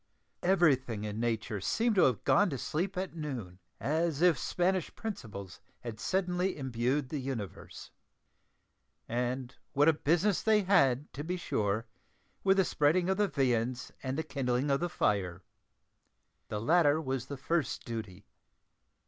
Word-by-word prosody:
Everything 135 Hz, -, +2 dB
in 105 Hz, 0 st, -4 dB
nature 110 Hz, -3 st, -1 dB
seemed 225 Hz, -, +1 dB
to 190 Hz, -, +5 dB
have 125 Hz, -6 st, +1 dB
gone 205 Hz, -1 st, +4 dB
to 140 Hz, -, -3 dB
sleep 180 Hz, -, -2 dB
at 185 Hz, -2 st, -3 dB
noon, 125 Hz, -, -5 dB, 0.2 s
as 160 Hz, 0 st, 0 dB
if 180 Hz, -3 st, +6 dB
Spanish 180 Hz, +5 st, 0 dB
principles 105 Hz, -, -7 dB, 0.2 s
had 115 Hz, -3 st, -7 dB
suddenly 180 Hz, +1 st, 0 dB
imbued 130 Hz, +1 st, -1 dB
the 150 Hz, -, -3 dB
universe. 125 Hz, -8 st, -6 dB, 1.2 s
And 125 Hz, +2 st, -2 dB, 0.2 s
what 145 Hz, +2 st, +4 dB
a 160 Hz, -, +7 dB
business 175 Hz, +6 st, +2 dB
they 215 Hz, -2 st, +3 dB
had, 140 Hz, -8 st, +3 dB
to 145 Hz, -, -5 dB
be 180 Hz, +3 st, -2 dB
sure, 110 Hz, -, -1 dB, 0.6 s
with 195 Hz, 0 st, +4 dB
the 190 Hz, -, +4 dB
spreading 165 Hz, +5 st, +2 dB
of 190 Hz, -, 0 dB
the 205 Hz, -1 st, +3 dB
viands 125 Hz, -4 st, 0 dB
and 130 Hz, +1 st, -3 dB
the 160 Hz, -, 0 dB
kindling 135 Hz, -2 st, -1 dB
of 140 Hz, -, +2 dB
the 175 Hz, -, -1 dB
fire! 95 Hz, -, 0 dB, 1.0 s
The 105 Hz, -, -3 dB
latter 155 Hz, +4 st, +4 dB
was 135 Hz, -4 st, -3 dB
the 140 Hz, -, -5 dB
first 160 Hz, +3 st, -1 dB
duty. 105 Hz, -4 st, -6 dB
140 Hz, 150 wpm, -31 LUFS, 120-175 Hz, 1.2 s, a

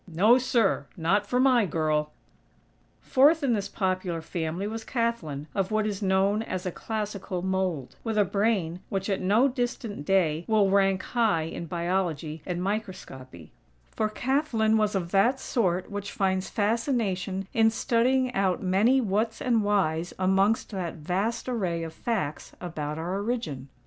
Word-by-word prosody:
No, 205 Hz, +9 st, +4 dB
sir!! 245 Hz, -5 st, +1 dB
Not 195 Hz, +5 st, +1 dB
for 250 Hz, +4 st, +1 dB
my 255 Hz, -5 st, +4 dB
girl!!" 155 Hz, -2 st, 0 dB, 0.9 s
Fourth 295 Hz, +4 st, +4 dB
in 260 Hz, -4 st, +2 dB
this 200 Hz, -2 st, -2 dB
popular 185 Hz, -4 st, -1 dB
family 165 Hz, +3 st, -3 dB
was 225 Hz, +2 st, -4 dB
Kathlyn, 230 Hz, -, -2 dB
of 195 Hz, -1 st, 0 dB
what 215 Hz, 0 st, +1 dB
is 205 Hz, -2 st, -3 dB
known 195 Hz, +2 st, +2 dB
as 185 Hz, -5 st, -4 dB
a 180 Hz, -, -1 dB
"classical 205 Hz, -3 st, -4 dB
mold;" 185 Hz, -8 st, -2 dB
with 225 Hz, -2 st, -2 dB
a 205 Hz, -, +4 dB
brain 195 Hz, -4 st, 0 dB
which, 195 Hz, +1 st, -2 dB
at 195 Hz, -, -1 dB
no 210 Hz, +8 st, +4 dB
distant 245 Hz, -, -3 dB
day, 165 Hz, -3 st, +2 dB
will 210 Hz, -3 st, +3 dB
rank 195 Hz, -1 st, +3 dB
high 220 Hz, -9 st, +1 dB
in 165 Hz, +1 st, -6 dB
Biology 170 Hz, -3 st, -2 dB
and 180 Hz, -1 st, -2 dB
Microscopy; 135 Hz, -, -5 dB, 0.4 s
for 215 Hz, -, -1 dB
Kathlyn 240 Hz, -2 st, +1 dB
was 215 Hz, -1 st, +1 dB
of 175 Hz, -3 st, -2 dB
that 235 Hz, +7 st, +3 dB
sort 185 Hz, -9 st, -1 dB
which 200 Hz, 0 st, -5 dB
finds 190 Hz, -1 st, 0 dB
fascination 205 Hz, -4 st, -1 dB
in 225 Hz, 0 st, +5 dB
studying 245 Hz, +3 st, +1 dB
out 190 Hz, -3 st, +1 dB
many 205 Hz, +8 st, +3 dB
whats 220 Hz, +1 st, -1 dB
and 235 Hz, -4 st, +1 dB
whys 175 Hz, -5 st, 0 dB
amongst 195 Hz, +5 st, +2 dB
that 185 Hz, -5 st, -4 dB
vast 190 Hz, +10 st, -2 dB
array 185 Hz, -9 st, -1 dB
of 160 Hz, -1 st, -6 dB
facts 190 Hz, -8 st, -3 dB
about 155 Hz, -4 st, -4 dB
our 180 Hz, +5 st, -2 dB
origin. 170 Hz, -, -3 dB
195 Hz, 155 wpm, -27 LUFS, 175-225 Hz, 0.9 s, in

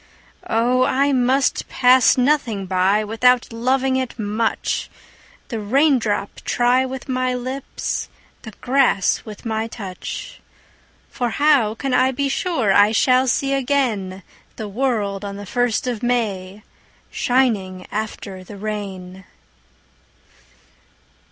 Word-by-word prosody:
Oh 245 Hz, +3 st, +2 dB
I 275 Hz, +2 st, +2 dB
must 260 Hz, +1 st, +1 dB
pass 255 Hz, 0 st, +5 dB
nothing 250 Hz, -7 st, +1 dB
by 190 Hz, +3 st, +2 dB
Without 240 Hz, +3 st, +2 dB
loving 260 Hz, +3 st, +1 dB
it 260 Hz, -3 st, -3 dB
much, 220 Hz, +1 st, -1 dB, 0.6 s
The 230 Hz, -, -3 dB
raindrop 225 Hz, -3 st, +1 dB
try 250 Hz, +2 st, +2 dB
with 265 Hz, +1 st, -7 dB
my 255 Hz, -1 st, 0 dB
lips, 255 Hz, +2 st, -4 dB, 0.3 s
The -, -, -9 dB
grass 255 Hz, -7 st, +2 dB
with 215 Hz, +1 st, -10 dB
my 220 Hz, 0 st, -2 dB
touch; 195 Hz, -6 st, -7 dB, 0.7 s
For 245 Hz, -2 st, -2 dB
how 270 Hz, -5 st, +3 dB
can 270 Hz, +2 st, -3 dB
I 255 Hz, +1 st, +4 dB
be 275 Hz, +1 st, -1 dB
sure 265 Hz, -, 0 dB
I 205 Hz, +2 st, +5 dB
shall 255 Hz, +3 st, +3 dB
see 275 Hz, +2 st, +1 dB
again 245 Hz, -9 st, -1 dB, 0.3 s
The 215 Hz, -, -6 dB
world 205 Hz, -3 st, -1 dB
on 200 Hz, -1 st, -5 dB
the 205 Hz, 0 st, -8 dB
first 245 Hz, +3 st, 0 dB
of 245 Hz, -4 st, -3 dB
May 210 Hz, -5 st, -2 dB, 0.5 s
Shining 205 Hz, -8 st, 0 dB
after 205 Hz, -3 st, -5 dB
the 200 Hz, +2 st, -11 dB
rain? 190 Hz, -3 st, -6 dB
235 Hz, 120 wpm, -20 LUFS, 205-260 Hz, 0.7 s, pass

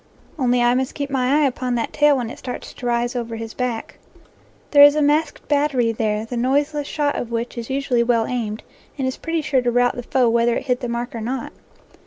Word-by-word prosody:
Only 245 Hz, -2 st, +2 dB
I 240 Hz, 0 st, +4 dB
must 260 Hz, +1 st, -1 dB
keep 280 Hz, -1 st, -4 dB
my 270 Hz, +3 st, +2 dB
eye -, -, +4 dB
upon 255 Hz, -2 st, -1 dB
that 230 Hz, -, -2 dB
tail 295 Hz, -1 st, +4 dB
when 240 Hz, -2 st, -3 dB
it -, -, -10 dB
starts 250 Hz, -, -7 dB
to 250 Hz, -, -9 dB
rise 240 Hz, +1 st, 0 dB
over 230 Hz, -2 st, -3 dB
his 225 Hz, 0 st, -6 dB
back. 245 Hz, -3 st, -4 dB, 0.7 s
There 285 Hz, -, +7 dB
is 290 Hz, +1 st, +9 dB
a 305 Hz, -, +2 dB
masked 300 Hz, +2 st, 0 dB
battery 285 Hz, -5 st, +2 dB
there 215 Hz, -1 st, -1 dB
the 240 Hz, +1 st, -5 dB
noiseless 285 Hz, +4 st, 0 dB
shot 290 Hz, -1 st, -1 dB
of 240 Hz, -, -4 dB
which 235 Hz, +1 st, -3 dB
is 235 Hz, -2 st, -6 dB
usually 265 Hz, -3 st, +1 dB
well 235 Hz, -1 st, +2 dB
aimed, 225 Hz, -3 st, -3 dB, 0.3 s
and 265 Hz, -2 st, -1 dB
is 260 Hz, -, -3 dB
pretty 330 Hz, -1 st, -2 dB
sure 285 Hz, -3 st, +1 dB
to 245 Hz, -, 0 dB
rout 245 Hz, +1 st, +2 dB
the 245 Hz, -, -4 dB
foe 250 Hz, +1 st, +1 dB
whether 235 Hz, +1 st, +2 dB
it -, -, -3 dB
hit 250 Hz, -2 st, 0 dB
the 245 Hz, -, -4 dB
mark 240 Hz, +1 st, -3 dB
or 230 Hz, -, -5 dB
not. 245 Hz, +3 st, -4 dB
250 Hz, 235 wpm, -21 LUFS, 235-280 Hz, 0.7 s, is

